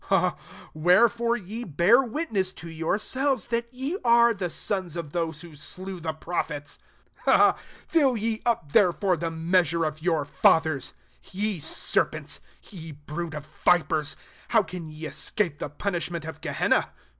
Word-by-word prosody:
31 - - +3 0.4
Wherefore 230 +9 +3
ye 220 +3 -6
bear 185 - +4
witness 225 - -2
to 170 - -10
yourselves, 210 - -1
that 235 0 -2
ye 270 +9 -4
are 235 -1 +5
the 190 -4 -3
sons 185 -2 -2
t)f 165 -4 -5
those 165 -2 -2
who 170 -2 -11
slew 185 +5 -7
the 160 -1 -2
prophets. 155 -2 -4 0.5
S2 - - +6 0.3
Fill 275 -7 +3
ye 220 +1 -1
up 220 -12 0
therefore 185 0 +3
the 165 0 -3
mea 165 +3 +2
sure 170 -1 -1
of 155 0 -4
your 160 -4 +1
fathers. 155 0 +2 0.3
33 190 - -12
Ye 185 - -5
ser - - +1
)ents! - - -7 0.3
ye 165 -5 -8
brood 150 +3 -6
of 150 -1 -6 0.2
vipers! 155 -3 +2 0.3
how 225 -3 +4
:anye 160 -3 -8
escape 170 -2 -2
the - - -4
punishment 170 0 -3
of 160 - -8
Uehenna? - - +1
175 Hz, 155 wpm, -26 LUFS, 160-220 Hz, 0.5 s, S2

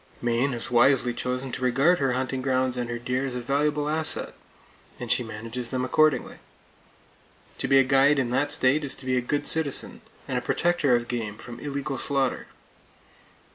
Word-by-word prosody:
Maine 120 +3 0
has 120 0 -5
wisely 125 0 +4
chosen 125 +2 -3
to 130 - -5
regard 135 +8 +3
her 135 -3 +1
hunting 130 +1 -2
grounds 130 -1 +1
and 120 -1 -3
her 120 - -3
deer 125 +2 -2
as 125 - -5
a - - -2
valuable 145 +4 0
asset, 155 +1 -1 0.7
and - - -4
she - - +3
manages 115 +2 -6
them 130 -1 -2
accordingly. 145 -1 +1 1.2
To - - -1
be 135 +1 +5
a 135 - +6
guide 135 +2 +4
in 125 -3 0
that 145 +3 +1
state 145 +1 +2
is 140 - -3
to 135 - -11
be 130 0 0
a 125 - +1
good 145 +4 -2
citizen, 160 -4 +1 0.3
and - - -1
a - - -9
protector 170 -7 +1
of 120 0 -1
game 110 -4 -4
from 120 0 -9
illegal 140 -2 -4
slaughter. 135 -3 -1
130 Hz, 185 wpm, -25 LUFS, 120-140 Hz, 1.2 s, a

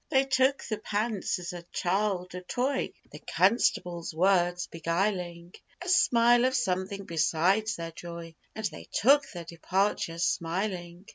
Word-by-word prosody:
They 265 0 +3
took 265 +1 +2
the 215 -2 -4
pants 210 -1 -1
as 180 0 -6
a 175 - -6
child 185 -1 -1
a 180 - -6
toy, 260 +8 -1 0.2
The - - -10
constable's 180 -5 +1
words 180 0 +2
beguiling 175 0 -2 0.3
A 355 - -8
smile 240 -7 +5
of 260 0 +1
something 195 -4 -1
beside 175 +5 +2
their 165 0 -5
joy; 170 0 -8 0.2
And 220 - -4
they 170 -6 -5
took 275 +5 +4
their 175 -3 -8
departure 170 0 -1
smiling. 175 +1 -2
185 Hz, 140 wpm, -28 LUFS, 170-220 Hz, 0.3 s, smile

